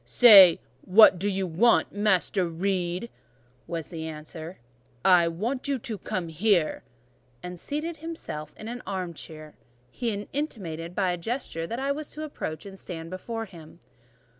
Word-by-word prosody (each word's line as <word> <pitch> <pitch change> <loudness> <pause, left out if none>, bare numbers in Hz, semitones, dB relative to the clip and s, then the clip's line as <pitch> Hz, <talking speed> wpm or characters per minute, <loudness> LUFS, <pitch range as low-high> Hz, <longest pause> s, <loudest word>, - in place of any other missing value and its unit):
"Say, 200 -8 +8 0.2
'What 190 -1 +7
do 200 +3 0
you 195 -1 -1
want, 185 +8 +3
Master 195 -2 +1
Reed?'" 180 +4 -2 0.6
was 165 -2 -5
the 160 -2 -6
answer. 160 +2 -8 0.5
"I 180 -3 +6
want 230 - -3
you 280 -1 0
to 220 -2 -5
come 175 -1 -3
here;" 175 0 +1 0.6
and 180 0 -7
seating 305 - -3
himself 320 - -7
in 215 - -8
an 245 +2 -6
arm 185 -3 -3
chair, 155 -1 -10 0.4
he 235 - -2 0.2
intimated 180 - -4
by 190 -3 +1
a 175 - -2
gesture 170 -4 -4
that 230 +6 -4
I 275 +1 0
was 295 +1 -4
to 310 - -6
approach 160 - -6
and 195 -1 -10
stand 165 -2 -7
before 225 +5 -5
him. 170 -6 -14
185 Hz, 155 wpm, -26 LUFS, 165-230 Hz, 0.6 s, Say